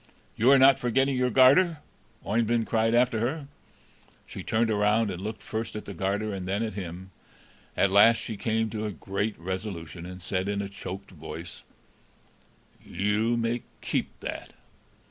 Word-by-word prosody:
"You 120 +4 +3
are 140 - +8
not 135 +1 +6
forgetting 135 +3 +1
your 125 0 +1
garter?" 140 +8 +5 0.5
Oeyvind 115 +1 +1
cried 115 +1 +1
after 120 -2 +3
her. 140 +6 -2 0.8
She - - -8
turned 110 0 +1
around, 105 +1 +2
and 90 0 -6
looked 110 +2 -6
first 110 0 -4
at 105 - -6
the 100 - -7
garter 100 +4 -1
and 95 -2 -5
then 100 +4 0
at 110 - -3
him. 95 -1 -7 0.7
At 100 - +3
last 115 +4 +7
she 110 0 -5
came 110 +1 -1
to 110 -1 -3
a - - -3
great 100 +4 -3
resolution, 85 -2 -6
and 90 0 -8
said, 95 +2 -2
in 100 0 -1
a 100 -1 -3
choked 100 0 -8
voice: 80 0 -9 1.2
"You 105 +5 0
may 115 +1 -1 0.2
keep - - -2
that." - - -6
105 Hz, 165 wpm, -27 LUFS, 95-115 Hz, 1.2 s, are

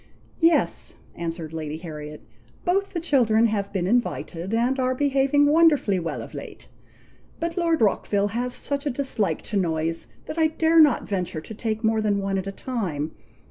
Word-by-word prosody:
"Yes," 330 0 +2 0.2
answered 165 -1 -5
Lady 155 -1 -4
Harriet, 150 -2 -8 0.4
"both 390 +3 +1
the 345 - -1
children 235 -9 +3
have 205 -3 -1
been 190 -3 -1
invited, 190 -5 -1
and 245 +4 +1
are 255 0 +1
behaving 275 +1 +3
wonderfully 295 - +4
well 165 -1 -4
of - - -11
late, - - -9 0.7
but 335 0 -2
Lord 335 -4 +1
Rockville 205 -1 +2
has 245 +3 -2
such 280 +1 -3
a - - +2
dislike 235 - -1
to 210 - -2
noise, 165 - -1 0.2
that 330 - -5
I 320 - +5
dare 320 +1 +3
not 295 -5 +5
venture 180 -5 -2
to 220 - -9
take 220 0 -3
more 220 0 +2
than 210 -2 +1
one 195 -1 -1
at 190 - -5
a - - -2
time. 185 - -3
220 Hz, 175 wpm, -24 LUFS, 180-280 Hz, 0.7 s, I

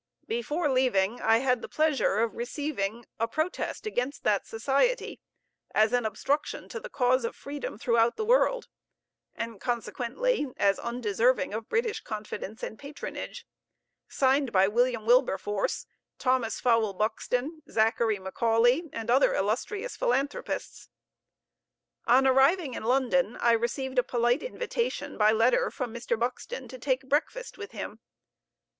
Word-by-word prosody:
Before 355 -9 -1
leaving, 245 -5 +2
I 225 0 +4
had 250 0 +1
the - - -7
pleasure 295 -9 +2
of 230 - -1
receiving 240 -4 -3
a 230 - +1
protest 315 - -3
against 280 -9 -2
that 205 -2 +1
Society 275 - 0 0.6
as 215 +2 +4
an 245 -3 +2
obstruction 280 +7 -2
to 470 - -5
the - - -9
cause 255 - +2
of 230 - -3
freedom 285 -6 -6
throughout 230 0 +2
the 435 - -1
world, - - +3 0.7
and, 230 -3 -5
consequently, 245 - -1
as 200 -1 +2
undeserving 235 0 0
of 220 +1 -5
British 450 -1 0
confidence 215 0 -6
and 220 - -5
patronage, 285 +1 -7 0.6
signed 270 -1 +2
by 190 -1 +4
William 235 +1 +1
Wilberforce, 210 -5 +1 0.3
Thomas 255 -4 0
Fowell 230 -4 +2
Buxton, 250 - -2
Zachary 225 -1 +2
Macaulay, 230 - +2
and 230 +1 -3
other 265 +3 +4
illustrious 395 - -2
philanthropists. 290 - -2 1.2
On 255 +3 +5
arriving 270 +3 +4
in - - -5
London 260 -1 +2
I 235 - +3
received 250 +3 0
a - - +3
polite 240 +2 +1
invitation 485 -1 -3
by 215 0 +4
letter 225 +3 +3
from 245 -3 -5
Mr. 235 -1 -2
Buxton 250 - -3
to 255 - -9
take 260 +1 -1
breakfast 335 - -1
with 410 0 -6
him. - - -6
245 Hz, 135 wpm, -28 LUFS, 225-285 Hz, 1.2 s, On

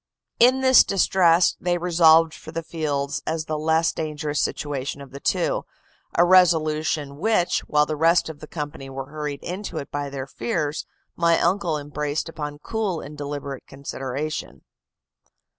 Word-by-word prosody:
In 255 +3 +5
this 260 -1 +7
distress 180 -3 +3
they 175 0 +1
resolved 165 -2 +5
for 160 - -10
the 165 0 -4
fields 145 -4 -2
as 160 -1 -2
the 155 - -3
less 160 +2 +2
dangerous 150 -1 -3
situation 140 -1 -3
of 140 -1 -11
the 140 - -8
two - - 0 0.5
a 175 - +5
resolution 155 -5 +3
which, 190 0 +2
while 150 0 +3
the 155 - -3
rest 165 +3 +3
of 160 -2 -8
the 155 - -10
company 145 -4 -6
were 135 +1 -7
hurried 150 -2 -5
into 190 +4 -5
it 140 - -6
by 145 0 -3
their 135 -1 -5
fears, 145 +4 -3 0.3
my 170 0 +3
uncle 175 -3 +1
embraced 150 +1 -3
upon 150 -3 -6
cool 200 +1 -2
and 150 0 -9
deliberate 145 -2 -6
consideration. 135 - -5
155 Hz, 155 wpm, -23 LUFS, 145-170 Hz, 0.5 s, this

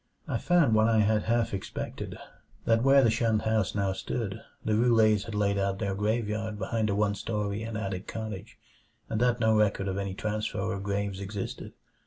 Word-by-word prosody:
I - - -1
found 170 -9 +3
what 110 +1 +4
I 110 -1 +4
had 105 0 +2
half 115 0 +1
expected, 95 - -5 0.5
that 115 0 +3
where 135 +1 +6
the 115 - +4
shunned 115 -1 +1
house 110 -4 +1
now 100 -2 +1
stood 110 +1 -4 0.2
the 110 - +1
Roulets 110 -3 +4
had 110 - -6
laid 100 -1 +1
out 100 0 0
their 100 0 -2
graveyard 105 +1 -1
behind 110 +2 -1
a 100 - +1
one 105 0 +2
story 105 0 -3
and 110 -1 -4
attic 95 -2 -4
cottage, 110 -2 -6 0.5
and 110 0 -1
that 125 0 +2
no 110 -1 +3
record 105 -2 +2
of 95 0 -2
any 100 -1 -3
transfer 105 0 -2
of 95 - -4
graves 100 -1 -2
existed. 100 0 -5
105 Hz, 190 wpm, -28 LUFS, 100-110 Hz, 0.5 s, where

